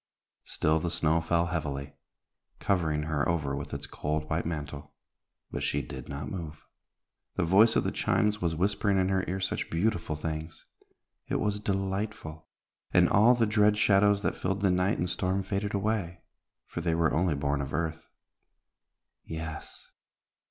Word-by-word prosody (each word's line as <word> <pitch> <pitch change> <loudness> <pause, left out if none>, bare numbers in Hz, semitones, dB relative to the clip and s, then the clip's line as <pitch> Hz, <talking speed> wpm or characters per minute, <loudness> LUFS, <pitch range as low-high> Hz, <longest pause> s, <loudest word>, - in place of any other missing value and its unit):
Still 80 +1 +1
the 85 - -2
snow 80 -1 +2
fell 85 +1 +1
heavily, 70 -5 -3 0.6
covering 80 -6 0
her 75 -1 0
over 75 -5 0
with 70 +1 -6
its 70 0 -5
cold 75 +2 -3
white 80 +1 -1
mantle, 75 -3 -6 0.6
but - - -3
she 70 0 0
did - - -8
not 70 0 -5
move. 80 -5 -7 0.7
The - - +1
voice 105 +6 +5
of - - +3
the - - -1
chimes 105 0 +1
was 85 -2 0
whispering 100 +3 +1
in 95 0 +2
her 95 -1 +1
ear 95 +1 -2
such 95 - -2
beautiful 85 -2 0
things. 80 +1 -5 0.6
It - - -2
was 105 0 0
delightful, 95 -4 -3 0.4
and - - +5
all 115 +5 +6
the 115 -1 +3
dread 105 -1 +3
shadows 100 0 +4
that - - 0
filled 95 +2 -2
the 95 -2 +3
night 90 +4 +2
and 90 - -1
storm 95 +2 -1
faded 100 +1 -2
away, 100 -4 -1 0.4
for 85 - -5
they 85 -1 +1
were 80 -1 +2
only 85 -1 +2
born 70 0 0
of 70 0 -5
earth. 80 +1 -3 1.2
Yes! 80 -1 -7
85 Hz, 160 wpm, -29 LUFS, 75-100 Hz, 1.2 s, all